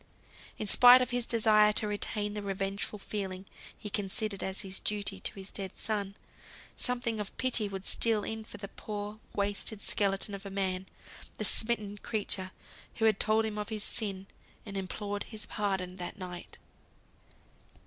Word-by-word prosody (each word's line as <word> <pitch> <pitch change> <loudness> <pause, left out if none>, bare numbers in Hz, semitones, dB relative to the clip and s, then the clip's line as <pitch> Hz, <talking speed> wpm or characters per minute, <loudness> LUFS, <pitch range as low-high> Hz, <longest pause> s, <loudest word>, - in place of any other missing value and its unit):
In - - -3
spite 245 +5 +9
of 250 - -4
his 245 -1 0
desire 215 -2 +5
to 210 - +3
retain 210 0 -1
the 210 - -3
revengeful 195 +1 -2
feeling 195 -2 -4 0.3
he - - -7
considered 200 0 -1
as 190 +1 -3
a 190 - -7
duty 205 -2 0
to - - -2
his 195 0 -8
dead 195 -2 -5
son, 200 -2 -2 0.6
something 240 -3 +1
of 210 -1 -5
pity 240 -5 +3
would 195 -1 -6
steal 225 -3 +4
in 220 0 -4
for - - -9
the 200 - -6
poor, 210 +1 -6 0.2
wasted 205 +1 -1
skeleton 200 0 +1
of 200 0 -6
a 200 - -6
man, 190 -1 -1 0.5
the 215 - 0
smitten 210 -2 +2
creature, 200 -4 -1 0.5
who 225 - +1
had 215 -3 +4
told 220 +1 +3
him 210 -1 -3
of 210 - -3
his 215 -2 -3
sin, 195 -3 -1 0.4
and 200 -2 -7
implored 205 +2 -3
his 215 -2 -6
pardon 190 -4 -1
that 180 +3 -5
night. 180 -2 -7
205 Hz, 165 wpm, -31 LUFS, 195-215 Hz, 0.6 s, spite